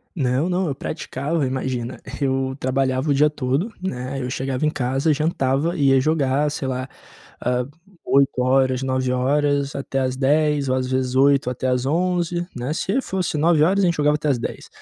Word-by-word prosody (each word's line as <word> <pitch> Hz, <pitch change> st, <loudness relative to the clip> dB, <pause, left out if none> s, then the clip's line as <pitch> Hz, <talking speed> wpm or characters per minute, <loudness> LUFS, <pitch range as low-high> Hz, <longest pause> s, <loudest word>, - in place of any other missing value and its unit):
Não 135 Hz, +1 st, +1 dB
não, 185 Hz, +1 st, 0 dB
eu 140 Hz, -, -2 dB
praticava, 140 Hz, +3 st, -3 dB
imagina, 130 Hz, -2 st, -3 dB, 0.2 s
eu 135 Hz, -1 st, 0 dB
trabalhava 130 Hz, +1 st, 0 dB
o -, -, +3 dB
dia 150 Hz, +2 st, +4 dB
todo, 145 Hz, -, -1 dB
né, 135 Hz, -6 st, -4 dB
eu 125 Hz, -, -3 dB
chegava 130 Hz, +2 st, -2 dB
em -, -, +4 dB
casa, 135 Hz, +3 st, 0 dB
jantava 150 Hz, +1 st, +1 dB
e 145 Hz, -5 st, 0 dB
ia 135 Hz, 0 st, +5 dB
jogar, 150 Hz, -1 st, +1 dB
sei 135 Hz, -2 st, -4 dB
lá, 130 Hz, 0 st, -3 dB, 0.5 s
ah, 125 Hz, 0 st, 0 dB, 0.4 s
20h, 130 Hz, -1 st, +2 dB
21h 135 Hz, +2 st, 0 dB
até 135 Hz, -1 st, -2 dB
às 130 Hz, -1 st, 0 dB
22h 145 Hz, +1 st, +1 dB
ou, 130 Hz, -, +1 dB
às 130 Hz, -, -1 dB
vezes 130 Hz, 0 st, -1 dB
20h 140 Hz, -1 st, +4 dB
até 125 Hz, +1 st, -3 dB
às 125 Hz, 0 st, 0 dB
23h, 175 Hz, +2 st, 0 dB
né? 125 Hz, +3 st, -3 dB
Se 195 Hz, +9 st, 0 dB
fosse 185 Hz, -, -2 dB
21h 170 Hz, +4 st, +3 dB
a -, -, +4 dB
gente 170 Hz, -1 st, +1 dB
jogava 150 Hz, 0 st, +3 dB
até 150 Hz, -, -3 dB
às 135 Hz, -4 st, +2 dB
22h, -, -, -6 dB
135 Hz, 180 wpm, -22 LUFS, 130-150 Hz, 0.5 s, ia